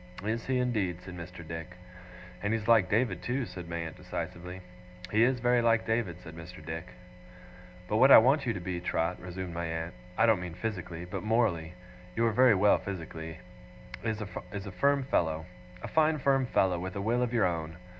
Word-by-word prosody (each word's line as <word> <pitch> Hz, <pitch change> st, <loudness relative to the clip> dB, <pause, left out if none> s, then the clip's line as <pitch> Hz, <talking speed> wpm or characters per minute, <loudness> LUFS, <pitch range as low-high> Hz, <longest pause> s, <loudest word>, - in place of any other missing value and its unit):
'Is 110 Hz, +2 st, -2 dB
he 130 Hz, -1 st, +1 dB
indeed?' 105 Hz, -9 st, 0 dB
said 90 Hz, -, -8 dB
Mr. 85 Hz, -1 st, -9 dB
Dick. 80 Hz, +2 st, -6 dB, 0.7 s
'And 105 Hz, +2 st, 0 dB
he's 110 Hz, -1 st, -2 dB
like 110 Hz, -6 st, +5 dB
David, 105 Hz, -4 st, +1 dB
too,' 125 Hz, +1 st, -1 dB
said 90 Hz, -3 st, -8 dB
my 85 Hz, -, -3 dB
aunt, 85 Hz, -1 st, -4 dB
decisively. 90 Hz, +1 st, -6 dB, 0.5 s
'He 110 Hz, -, +3 dB
is 125 Hz, +1 st, +4 dB
very 120 Hz, 0 st, +3 dB
like 115 Hz, -1 st, +3 dB
David!' 110 Hz, -6 st, -1 dB
said 80 Hz, -1 st, -10 dB
Mr. 85 Hz, 0 st, -10 dB
Dick. 85 Hz, +2 st, -5 dB, 1.0 s
'But 105 Hz, -, +1 dB
what 130 Hz, +4 st, +7 dB
I -, -, +12 dB
want 135 Hz, +4 st, +4 dB
you -, -, +3 dB
to 100 Hz, -, -4 dB
be, 90 Hz, 0 st, -4 dB
Trot,' 85 Hz, 0 st, -1 dB
resumed 90 Hz, 0 st, -6 dB
my 85 Hz, 0 st, -3 dB
aunt, 80 Hz, +1 st, -4 dB
' 90 Hz, -, -20 dB
I 115 Hz, -, +5 dB
don't 110 Hz, -5 st, +4 dB
mean 90 Hz, -2 st, -6 dB
physically, 90 Hz, -4 st, -4 dB
but 90 Hz, -, -5 dB
morally; 105 Hz, -7 st, +1 dB, 0.4 s
you 115 Hz, -, +2 dB
are 115 Hz, -, +3 dB
very 125 Hz, 0 st, +6 dB
well 100 Hz, +2 st, +4 dB
physically 80 Hz, -4 st, -6 dB, 0.7 s
is, 110 Hz, -2 st, -1 dB
a 100 Hz, -1 st, -6 dB
firm 140 Hz, +7 st, +2 dB
fellow. 80 Hz, -, 0 dB, 0.4 s
A -, -, -3 dB
fine 160 Hz, 0 st, +3 dB
firm 135 Hz, -2 st, +2 dB
fellow, 95 Hz, -6 st, +2 dB
with 95 Hz, +1 st, -5 dB
a 100 Hz, -, -2 dB
will 115 Hz, +4 st, +1 dB
of 125 Hz, -1 st, 0 dB
your 120 Hz, -3 st, +3 dB
own. 80 Hz, -2 st, -2 dB
95 Hz, 200 wpm, -30 LUFS, 85-115 Hz, 1.0 s, I